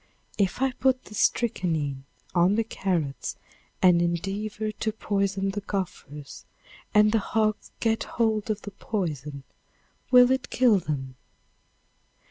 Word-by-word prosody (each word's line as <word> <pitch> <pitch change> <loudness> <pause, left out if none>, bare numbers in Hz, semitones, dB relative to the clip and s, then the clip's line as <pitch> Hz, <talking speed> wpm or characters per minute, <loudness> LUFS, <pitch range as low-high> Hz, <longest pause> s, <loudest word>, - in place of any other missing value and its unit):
If 200 +6 +1
I 270 - +2
put 255 0 +1
the - - -12
strychnine 160 - 0 0.3
on 180 +3 +4
the 225 - +2
carrots, 175 -10 -2 0.5
and 180 -2 +6
endeavor 200 +5 -2
to 220 +1 -2
poison 195 -2 -1
the 205 +1 -4
gophers, 165 -8 -5 0.5
and 210 0 +5
the 225 - +3
hogs 215 0 0
get 225 -1 +1
hold 220 -2 0
of 210 -1 -2
the 205 - -7
poison 150 - -4 0.7
will 250 0 +7
it 260 -1 0
kill 240 -6 +4
them? 135 -6 -4
200 Hz, 125 wpm, -26 LUFS, 170-220 Hz, 0.7 s, will